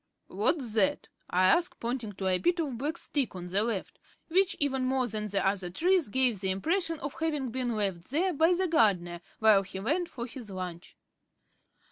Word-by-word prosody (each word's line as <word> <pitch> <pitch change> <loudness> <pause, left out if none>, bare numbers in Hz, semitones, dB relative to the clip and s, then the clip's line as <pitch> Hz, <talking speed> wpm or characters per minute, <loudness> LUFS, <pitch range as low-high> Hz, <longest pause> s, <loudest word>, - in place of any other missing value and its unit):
"What's 255 -10 +1
that?" 210 -4 +1 0.2
I 180 +1 +2
asked, 340 - +2
pointing 235 -3 -3
to 190 - -6
a 185 -1 +2
bit 350 0 +1
of 290 -6 -2
black 295 +7 -3
stick 280 - -1
on 180 -1 -6
the 190 +3 0
left; 220 -4 -3 0.3
which, 375 +3 +2
even 270 -3 0
more 255 -1 +1
than 215 -1 -4
the 200 -2 -1
other 195 -2 0
trees, 350 - +2
gave 250 -3 +2
the 190 - -1
impression 330 - 0
of 285 - -5
having 300 -6 -1
been 245 -1 -2
left 195 -5 -2
there 350 +7 +1
by 325 +4 +4
the 370 +1 0
gardener 180 - +2 0.2
while 215 -3 +5
he 190 0 -7
went 320 - -1
for 235 -3 -6
his 245 -3 -9
lunch. 180 -2 -7
235 Hz, 190 wpm, -29 LUFS, 195-310 Hz, 0.3 s, while